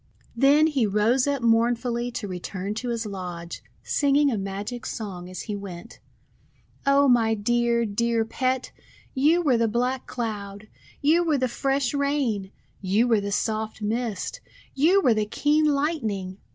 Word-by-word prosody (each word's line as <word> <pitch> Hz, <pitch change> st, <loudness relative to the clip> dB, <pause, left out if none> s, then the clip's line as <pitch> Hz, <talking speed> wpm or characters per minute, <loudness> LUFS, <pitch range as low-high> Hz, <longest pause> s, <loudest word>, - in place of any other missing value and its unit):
Then 280 Hz, +5 st, +5 dB
he 275 Hz, -8 st, +1 dB
rose 225 Hz, +6 st, +2 dB
up 280 Hz, -3 st, -1 dB
mournfully 235 Hz, +1 st, +1 dB
to 215 Hz, -, -4 dB
return 185 Hz, +2 st, -5 dB
to 240 Hz, +3 st, -4 dB
his 230 Hz, -1 st, -2 dB
lodge, 180 Hz, -4 st, -6 dB, 0.2 s
singing 285 Hz, 0 st, +2 dB
a -, -, 0 dB
magic 200 Hz, +5 st, -5 dB
song 185 Hz, -5 st, -6 dB
as 185 Hz, -2 st, -6 dB
he 210 Hz, -, -4 dB
went: 200 Hz, +1 st, -9 dB, 0.4 s
— -, -, -35 dB
"0 280 Hz, 0 st, +4 dB
my 225 Hz, -2 st, +3 dB
dear, 235 Hz, +2 st, +1 dB
dear 230 Hz, +2 st, 0 dB
Pet! 255 Hz, +2 st, -1 dB, 0.4 s
You 310 Hz, +6 st, +3 dB
were 265 Hz, -6 st, +3 dB
the 230 Hz, 0 st, +2 dB
black 250 Hz, +4 st, -1 dB
Cloud! 210 Hz, -3 st, -5 dB, 0.3 s
You 320 Hz, +4 st, +4 dB
were 315 Hz, -4 st, +1 dB
tJie 255 Hz, -1 st, 0 dB
fresh 270 Hz, 0 st, 0 dB
Rain! 275 Hz, -9 st, -1 dB, 0.3 s
You 205 Hz, +5 st, +2 dB
were 225 Hz, -3 st, +3 dB
the 200 Hz, 0 st, -4 dB
soft 220 Hz, +1 st, -2 dB
Mist! 220 Hz, -2 st, -3 dB, 0.3 s
You 340 Hz, +8 st, +4 dB
were 245 Hz, -, +4 dB
the 215 Hz, -1 st, -1 dB
keen 300 Hz, +7 st, +2 dB
Lightning! 240 Hz, -, -1 dB
235 Hz, 155 wpm, -25 LUFS, 205-270 Hz, 0.4 s, Then